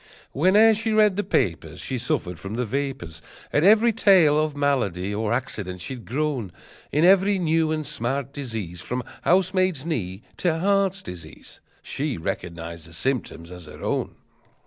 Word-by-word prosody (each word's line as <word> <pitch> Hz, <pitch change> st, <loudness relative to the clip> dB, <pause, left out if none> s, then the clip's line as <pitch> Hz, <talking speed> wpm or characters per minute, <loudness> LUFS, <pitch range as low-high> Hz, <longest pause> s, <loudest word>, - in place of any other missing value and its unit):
Whene'er 205 Hz, +9 st, +5 dB
she 220 Hz, +1 st, -1 dB
read 210 Hz, -3 st, +4 dB
the 205 Hz, -, -1 dB
papers 85 Hz, -, -1 dB
She 130 Hz, -2 st, -2 dB
suffered 90 Hz, -7 st, -2 dB
from 100 Hz, +6 st, -6 dB
the 125 Hz, +1 st, -1 dB
vapors, 130 Hz, -, -4 dB, 0.3 s
At 145 Hz, -, +3 dB
every 220 Hz, +4 st, +5 dB
tale 170 Hz, -8 st, +5 dB
of 150 Hz, -2 st, -4 dB
malady 105 Hz, -10 st, 0 dB
or 105 Hz, +1 st, -1 dB
accident 105 Hz, -7 st, -2 dB
she'd 120 Hz, +6 st, -6 dB
groan; 135 Hz, -7 st, -2 dB, 0.4 s
In 150 Hz, +4 st, +3 dB
every 195 Hz, +2 st, +5 dB
new 160 Hz, -2 st, +1 dB
and 155 Hz, -1 st, -2 dB
smart 135 Hz, +3 st, -2 dB
disease, 110 Hz, -, -5 dB
From 125 Hz, 0 st, -3 dB, 0.2 s
housemaid's 185 Hz, -4 st, +2 dB
knee 105 Hz, -, -3 dB
to 170 Hz, -3 st, +1 dB
heart 195 Hz, +1 st, +1 dB
disease, 85 Hz, -3 st, -10 dB, 0.2 s
She 140 Hz, -3 st, -2 dB
recognized 85 Hz, -1 st, -5 dB
the 85 Hz, -, -14 dB
symptoms 90 Hz, -6 st, -3 dB
as 90 Hz, -3 st, -10 dB
her 75 Hz, -, -11 dB
own! -, -, -2 dB
135 Hz, 155 wpm, -24 LUFS, -, 0.4 s, Whene'er